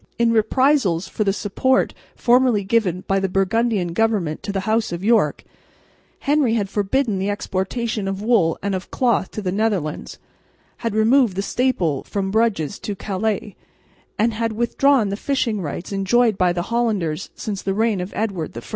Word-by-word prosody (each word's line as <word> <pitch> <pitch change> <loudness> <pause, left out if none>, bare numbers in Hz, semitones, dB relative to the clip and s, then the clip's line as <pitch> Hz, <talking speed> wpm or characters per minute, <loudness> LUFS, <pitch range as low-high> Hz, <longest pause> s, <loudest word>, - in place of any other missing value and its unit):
In 235 -1 +3
reprisals 225 - +2
for 215 - -2
the 200 - +2
support 210 +7 +1 0.2
formerly 245 -4 +3
given 190 -4 0
by 195 0 +2
the 195 0 -1
Burgundian 195 -1 0
government 200 -7 0
to 205 - -4
the 195 -1 -2
house 220 +1 0
of 175 +2 -5
York, 215 -9 +2 0.8
Henry 280 -5 +2
had 205 -4 -1
forbidden 210 +1 0
the 195 +2 -1
exportation 205 +2 -2
of 195 0 -3
wool 210 -7 +2
and 200 0 -1
of 185 0 -4
cloth 240 -6 +1
to 215 - -6
the 180 - -1
Netherlands, 195 -7 -2 0.6
had 230 -3 -3
removed 225 -1 +4
the 195 - -1
staple 190 - 0
from 195 -1 -3
Bruges 205 -6 0
to 205 - -4
Calais, 205 +1 -3 0.6
and 225 +2 +2
had 225 0 -2
withdrawn 240 0 +2
the 200 - -2
fishing 230 -3 -1
rights 170 +3 -5
enjoyed 215 +3 +2
by 180 -1 +2
the 175 0 -2
Hollanders 200 -9 -1
since 200 -3 -4
the 195 0 -2
reign 220 -3 +1
of 180 +3 -5
Edward 190 - -3
I. - - -5
205 Hz, 170 wpm, -21 LUFS, 190-230 Hz, 0.8 s, removed